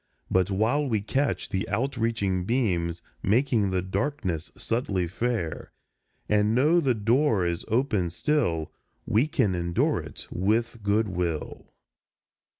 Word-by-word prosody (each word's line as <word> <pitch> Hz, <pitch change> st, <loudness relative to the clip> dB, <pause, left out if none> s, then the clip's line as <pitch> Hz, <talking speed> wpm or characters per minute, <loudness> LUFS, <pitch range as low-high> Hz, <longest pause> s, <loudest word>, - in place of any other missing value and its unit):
But 95 Hz, 0 st, +3 dB
while 110 Hz, +9 st, +1 dB
we 110 Hz, -3 st, +1 dB
catch 135 Hz, +7 st, -1 dB
the 95 Hz, -1 st, -2 dB
out 130 Hz, +7 st, -1 dB
reaching 105 Hz, -6 st, 0 dB
beams, 90 Hz, -7 st, 0 dB, 0.2 s
Making 110 Hz, -1 st, +2 dB
the 95 Hz, -1 st, 0 dB
darkness 95 Hz, -, -2 dB
subtly 100 Hz, -6 st, -1 dB
fair, 100 Hz, -3 st, -3 dB, 0.6 s
And 105 Hz, +1 st, +2 dB
know 150 Hz, +7 st, +4 dB
the 135 Hz, -7 st, +2 dB
door 110 Hz, -2 st, +2 dB
is 85 Hz, -1 st, -2 dB
open 110 Hz, -7 st, +1 dB
still, 85 Hz, -, 0 dB, 0.3 s
We 115 Hz, +8 st, +2 dB
can 105 Hz, -9 st, +1 dB
endure 85 Hz, -1 st, +1 dB
it -, -, -8 dB
with 115 Hz, +5 st, 0 dB
goodwill. 95 Hz, -6 st, -1 dB
105 Hz, 125 wpm, -26 LUFS, 90-120 Hz, 0.6 s, know